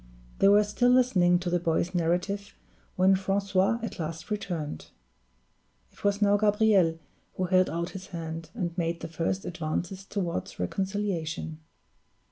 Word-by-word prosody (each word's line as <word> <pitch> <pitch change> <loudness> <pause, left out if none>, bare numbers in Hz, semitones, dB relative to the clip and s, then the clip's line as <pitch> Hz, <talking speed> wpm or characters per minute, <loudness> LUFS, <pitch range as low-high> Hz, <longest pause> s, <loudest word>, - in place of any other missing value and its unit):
They - - +5
were 205 +1 +6
still 210 +4 +1
listening 205 -9 +4
to 175 0 -3
the 175 - +2
boy's 170 +1 0
narrative 180 +4 -1 0.4
when 190 +1 +5
Francois 195 +2 +1
at 225 - -5
last 165 +3 -5
returned. 175 - -4 1.0
It - - -20
was 205 0 +2
now 205 0 +4
Gabriel 205 -5 +3 0.4
who 185 - -1
held 185 0 +3
out 170 +1 -3
his 190 0 -8
hand, 165 -2 -6
and 175 -7 -3
made 170 0 -1
the 165 - -4
first 165 +4 -2
advances 175 +3 -3
toward 180 - -4
reconciliation. 170 - -2
185 Hz, 140 wpm, -28 LUFS, 170-200 Hz, 1.0 s, were